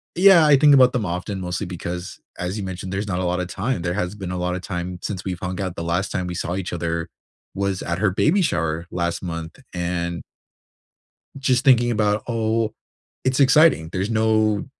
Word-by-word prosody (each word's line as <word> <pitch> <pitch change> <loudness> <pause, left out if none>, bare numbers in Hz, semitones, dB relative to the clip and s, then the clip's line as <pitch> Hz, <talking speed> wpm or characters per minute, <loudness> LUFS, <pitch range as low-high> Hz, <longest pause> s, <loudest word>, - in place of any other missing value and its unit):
yeah, 180 -2 +7
I 145 -2 +6
think 145 0 +6
about 130 -2 +6
them 120 -4 0
often 90 +3 -4
mostly 90 +2 -3
because, 90 0 -6 0.2
as 90 +2 -3
you 100 - -4
mentioned, 95 0 -5
there's 100 +2 -2
not 90 -3 -2
a - - -1
lot 90 +1 0
of 90 - -2
time, 100 +2 -2
there 85 +1 -1
hasn't 100 +1 -3
been 95 -2 -5
a 90 - -3
lot 90 0 -1
of 95 - -5
time 90 -1 -5
since 95 -4 -5
we've 90 -2 -3
hung 90 0 -4
out, 95 -2 -3
the 85 - -4
last 90 +3 -1
time 90 -1 -2
we 90 - -4
saw 85 - -3
each 95 -1 -4
other 85 -1 -2 0.5
was 100 -1 -1
at 85 - -2
her 100 -1 +2
baby 160 - +2
shower 85 - -1
last 85 0 -2
month 85 -2 -6
and 85 -1 -2 1.2
just 130 -1 +1
thinking 120 -3 +5
about, 105 -2 +1
oh, 115 -1 0 0.5
it's 130 +1 +1
exciting, 140 - +5
there's 95 +4 -2
no 110 -1 +2
95 Hz, 205 wpm, -22 LUFS, 90-110 Hz, 1.2 s, yeah